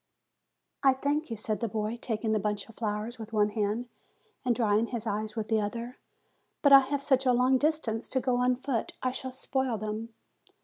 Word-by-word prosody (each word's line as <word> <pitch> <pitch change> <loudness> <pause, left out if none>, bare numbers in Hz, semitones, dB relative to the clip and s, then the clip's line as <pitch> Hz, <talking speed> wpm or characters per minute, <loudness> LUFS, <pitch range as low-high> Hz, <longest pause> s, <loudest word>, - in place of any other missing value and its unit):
"I 270 -2 +5
thank 290 +3 -1
you," 225 - -4
said 215 0 -2
the 230 - -1
boy, 215 +1 -2
taking 225 -2 -2
the 215 - +2
bunch 205 0 -2
of 225 - -14
flowers 215 +2 -3
with 220 0 -8
one 210 -1 +3
hand 215 +3 -1 0.6
and 245 -2 +2
drying 220 -1 +2
his 235 -2 -4
eyes 215 0 -2
with 220 -2 -3
the 220 -1 +2
other; 235 +4 -5 0.6
"but 285 -1 +7
I 275 - +12
have 275 +1 -2
such 265 -2 +2
a - - +6
long 255 +2 +4
distance 285 -7 0
to 260 - 0
go 255 -1 +1
on 250 0 +3
foot 255 -3 -2
I 255 - +1
shall 260 0 -5
spoil 260 -2 -1
them." 215 +2 -4
235 Hz, 205 wpm, -29 LUFS, 215-260 Hz, 0.6 s, I